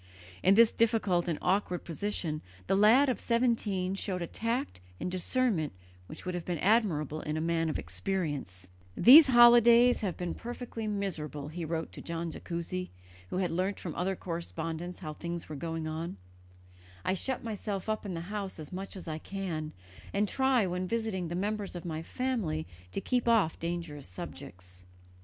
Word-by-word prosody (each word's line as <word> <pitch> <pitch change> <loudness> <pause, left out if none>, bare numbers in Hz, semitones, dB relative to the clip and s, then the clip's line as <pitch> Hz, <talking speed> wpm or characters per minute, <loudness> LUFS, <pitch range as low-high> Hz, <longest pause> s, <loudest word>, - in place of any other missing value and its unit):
In 190 +2 +5
this 230 +1 +7
difficult 210 -6 +2
and 165 -3 0
awkward 185 -2 +1
position 165 -3 -3 0.2
the - - +2
lad 225 +8 +6
of 255 - 0
seventeen 225 -6 +1
showed 190 -2 -2
a - - -1
tact 230 - -3 0.2
and 180 - -3
discernment 185 - 0 0.3
which 155 - -10
would 180 - -2
have 175 -1 -3
been 175 -1 -2
admirable 165 - +2
in 155 0 -3
a - - 0
man 165 0 +1
of - - -1
experience, 145 - -3 0.3
"These 285 +5 +10
holidays 240 0 +7
have 190 -5 -2
been 175 -1 -3
perfectly 240 -2 -6
miserable," 160 -8 -3
he 170 +2 -5
wrote 165 0 -3
to - - -9
Don 165 0 -4
Jacuzzi, 175 +2 -4 0.4
who - - -3
had 185 -2 0
learnt 185 +4 -1
from 170 - -5
other 190 +2 -1
correspondents 165 0 -5
how 155 - -5
things 170 +2 -5
were 155 - -6
going 165 +2 -3
on; 160 -5 -4 0.9
"I 185 - +2
shut 255 +7 -1
myself 210 -3 -4
up 215 0 -1
in 195 -4 -4
the 165 - -4
house 195 +1 -5
as 155 +2 -8
much 195 +2 -6
as 185 - -8
I 155 -1 -3
can 165 -5 -4 0.4
and 205 +1 +2
try 265 0 +3
when 180 0 -2
visiting 220 -5 -1
the 170 - -4
members 205 +1 -2
of 175 - -6
my 160 -2 -3
family 195 -8 -2 0.3
to - - -2
keep 250 +1 0
off 220 -9 +3
dangerous 165 -4 -4
subjects." 90 0 -10
180 Hz, 175 wpm, -30 LUFS, 165-215 Hz, 0.9 s, These